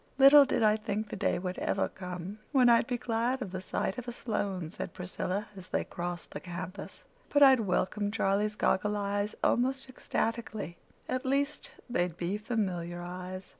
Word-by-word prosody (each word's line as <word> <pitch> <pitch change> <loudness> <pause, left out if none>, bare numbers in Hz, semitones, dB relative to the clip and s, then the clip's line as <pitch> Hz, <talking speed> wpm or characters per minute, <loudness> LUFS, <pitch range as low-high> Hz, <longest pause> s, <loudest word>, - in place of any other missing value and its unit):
"Little 280 +1 +9
did 240 - +1
I 215 0 +5
think 215 0 -3
the - - -4
day - - +1
would 180 0 -4
ever 195 - +1
come 180 +2 -7
when 255 -4 +5
I'd 235 0 +5
be 245 - -1
glad 240 +2 0
of 190 - -7
the 185 0 -4
sight 190 +3 -2
of 250 - -9
a - - -2
Sloane," 195 -8 -3
said - - -6
Priscilla, 185 +2 -3
as 185 -1 -10
they - - 0
crossed 175 0 -5
the - - -5
campus, 180 +2 -7 0.3
"but 290 0 +5
I'd 265 -2 +8
welcome 205 0 0
Charlie's 210 0 +1
goggle 210 +1 +1
eyes 205 +1 -1
almost 265 +2 +2
ecstatically. 225 - -3 0.3
At 255 0 -1
least, 280 +2 0 0.2
they'd 175 -8 -1
be 185 +4 -2
familiar 185 -6 -2
eyes." 180 +1 -6
205 Hz, 175 wpm, -30 LUFS, 185-240 Hz, 0.3 s, Little